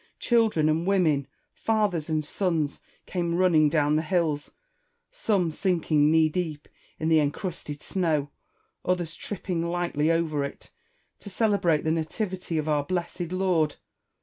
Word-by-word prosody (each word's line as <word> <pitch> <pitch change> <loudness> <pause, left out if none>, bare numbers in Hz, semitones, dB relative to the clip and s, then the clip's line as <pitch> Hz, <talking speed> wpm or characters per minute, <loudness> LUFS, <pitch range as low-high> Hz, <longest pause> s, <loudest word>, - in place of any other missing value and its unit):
Children 220 -10 +2
and 160 +3 +1
women, 160 -8 +2 0.3
fathers 205 -8 0
and 155 -1 0
sons, 160 -4 -1 0.2
came 170 -2 -1
running 170 -4 +4
down 150 0 +2
the - - +2
hills 160 -3 0 0.4
— - - -45 0.2
some 205 - 0
sink 175 -1 -1
ing 150 -1 +5
knee 160 0 +5
deep 155 -2 -3 0.3
in 160 - -1
the 160 -1 +5
encrusted 150 -1 -3
snow, 155 -6 0 0.5
others 175 -3 -1
tripping 180 -4 -4
lightly 170 -3 0
over 165 -3 +1
it 140 - -8 0.2
— - - -44
to 205 - -9
celebrate 195 -6 +2
the 160 - +1
nativity 175 +2 -2
of 155 0 -1
our 150 -2 +2
blessed 175 +1 -3
Lord. 180 -5 +1
165 Hz, 150 wpm, -26 LUFS, 155-185 Hz, 0.5 s, ing